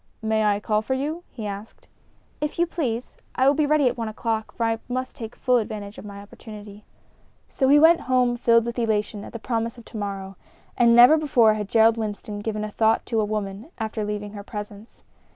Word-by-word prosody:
"May 220 0 +1
I 205 -1 +2
call 215 0 0
for 260 +4 -2
you?" 305 +6 -3
he 225 -4 -8
asked. 205 +2 -8 0.5
"If 300 0 -3
you 345 - +3
please. 255 -9 -4 0.2
I 260 - +2
will 280 - +6
be 300 0 +1
ready 300 -2 +3
at 245 - -1
one 225 - -2
o'clock, 220 0 -3
for 230 - -2
I 225 0 0
must 255 +1 -3
take 225 -1 -8
full 250 -1 +2
advantage 215 -2 -5
of - - -11
my 200 -1 -9
opportunity." 210 0 -12 0.6
So 265 - 0
he 285 +2 +6
went 325 +3 +6
home 250 -1 +3
filled 230 -1 +3
with 235 +1 -4
elation 210 -2 -1
at - - -9
the - - -6
promise 230 0 -3
of 235 - -13
to 230 - -9
morrow. 195 -2 -5 0.4
And 235 -1 +5
never 245 +6 +8
before 240 -8 +4
had 210 -2 -4
Gerald 225 +1 +4
Winston 210 -1 -5
given 215 0 -3
a 215 - -5
thought 220 +1 +2
to 225 -2 0
a - - 0
woman 210 +3 -4
after 220 -1 -3
leaving 210 0 -4
her 205 - -7
presence. 210 0 -9
225 Hz, 215 wpm, -24 LUFS, 210-245 Hz, 0.6 s, never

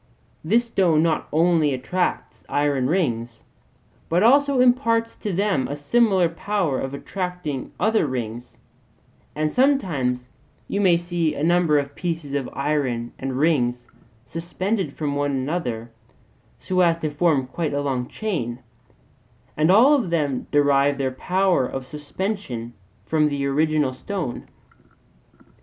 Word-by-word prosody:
This 225 +9 +2
stone 175 -9 +2
not 165 -2 0
only 160 -3 +3
attracts 180 +8 -2
iron 145 -3 +1
rings, 120 -10 -1 0.7
but 175 +4 +2
also 280 +3 +4
imparts 230 -2 +2
to 210 - -4
them 190 -6 0
a 145 - -4
similar 190 +4 +3
power 170 -4 -1
of 135 +1 -4
attracting 180 -4 -4
other 215 -4 +2
rings; 120 -2 -5 0.8
and 155 0 0
sometimes 160 - +1 0.4
you 200 - -1
may 180 -4 +5
see 170 -2 -1
a 145 - -3
number 170 -2 +3
of 140 0 -2
pieces 165 -4 -4
of 140 -2 -2
iron 135 -5 -1
and 130 -1 -3
rings 125 -6 +1 0.4
suspended 170 - -3
from 145 -2 -2
one 145 0 0
another 130 -5 -3 0.7
so 185 0 -2
as 170 -2 +3
to 155 -2 -3
form 145 -3 +2
quite 145 +3 -3
a 145 - 0
long 130 -3 -2
chain: 150 - -3 1.0
and 155 +2 +2
all 235 +10 +7
of 250 -11 +1
them 145 -6 -1
derive 145 -1 +3
their 135 -1 -1
power 180 0 +1
of 135 -1 -5
suspension 145 - -5 0.3
from 155 -1 +2
the 140 -1 -2
original 150 -1 +1
stone. 160 -2 -5
155 Hz, 135 wpm, -23 LUFS, 135-185 Hz, 1.0 s, all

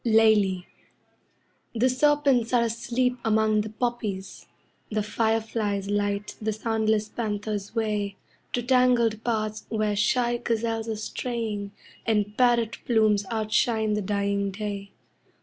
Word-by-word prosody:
LEILI 215 -5 +4 1.1
The 235 +3 +3
serpents 265 -2 +2
are 240 -1 +4
asleep 240 +2 -1
among 220 -1 +3
the 215 - -5
poppies, 215 -4 -4 0.4
The 215 -1 -1
fireflies 215 -2 -1
light 205 0 -1
the 220 0 0
soundless 220 -1 0
panther's 210 -1 -4
way 210 -3 -1 0.4
To 245 - 0
tangled 245 -3 +3
paths 215 -2 -2
where 215 -2 0
shy 240 +3 +2
gazelles 225 -1 -1
are 220 - -1
straying, 215 -2 -4 0.3
And 210 -2 0
parrot 240 -2 +2
plumes 215 -3 +3
outshine 220 0 +1
the 210 - 0
dying 200 0 0
day. 200 0 -5
220 Hz, 115 wpm, -26 LUFS, 210-235 Hz, 1.1 s, LEILI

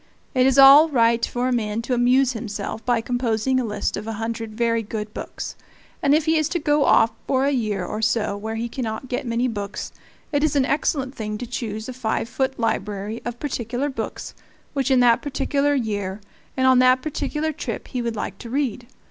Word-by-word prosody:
It 255 -1 +4
is 265 0 +2
all 275 +4 +9
right 235 -4 +3
for 245 +1 0
a 255 - +1
man 220 -1 -1
to 250 - -2
amuse 250 +2 +3
himself 215 -1 -5
by 240 -1 +1
composing 245 +1 0
a - - 0
list 210 -3 -2
of 210 +2 -6
a 225 - -3
hundred 225 0 -4
very 230 -1 +1
good 210 -1 -5
books; - - -6 0.5
and 285 0 +4
if 310 0 +1
he 320 0 +3
is 310 -2 +1
to 345 - -1
go 295 -1 +2
off 225 +1 +5 0.2
for 265 0 +2
a 285 - +2
year 215 -8 -1
or 215 +4 -4
so 215 -1 +1
where 220 +2 -5
he 230 +1 -2
cannot 235 0 -5
get 250 0 -3
many 235 +2 +1
books, 205 -4 -5 0.4
it 290 -1 +1
is 310 - +2
an 275 -2 +3
excellent 275 -2 0
thing 210 -4 -4
to 245 - -5
choose 220 -3 -5
a 255 - -5
five 230 -2 -2
foot 265 +2 -2
library 210 -1 -2
of 240 0 -4
particular 255 0 -2
books 265 - -5 0.4
which 275 -2 0
in 260 -2 +4
that 235 -1 +5
particular 285 0 0
year 205 -6 -2 0.4
and 260 - +2
on 260 -1 +6
that 255 0 +4
particular 310 +1 -2
trip 310 - -6
he 250 - -2
would 235 -1 -2
like 210 - -5
to 235 - -8
read. 250 -3 -2
245 Hz, 210 wpm, -23 LUFS, 220-270 Hz, 0.5 s, all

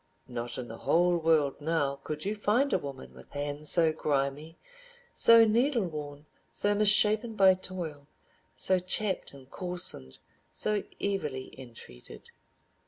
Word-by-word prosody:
Not 120 -1 -6
in 125 - -6
the 115 - -10
whole 175 +1 +2
world 160 -4 +1
now 145 -3 -1
could 150 +3 -7
you 205 - -1
find 230 +7 +1
a - - +2
woman 140 -4 -9
with - - -16
hands 145 +1 -2
so 165 -2 +4
grimy, 150 +1 -2 0.6
so 230 0 +6
needle 235 +1 +1
worn, 150 -3 -8 0.2
so 205 0 +1
misshapen 215 +2 +4
by 190 -2 +6
toil, 175 -6 -7 0.5
so 185 -1 +1
chapped 190 +2 -2
and 135 -2 -15
coarsened, 175 - 0 0.3
so 210 -1 -1 0.2
evilly 150 -10 -3
entreated. 115 - -13
165 Hz, 135 wpm, -29 LUFS, 140-200 Hz, 0.6 s, so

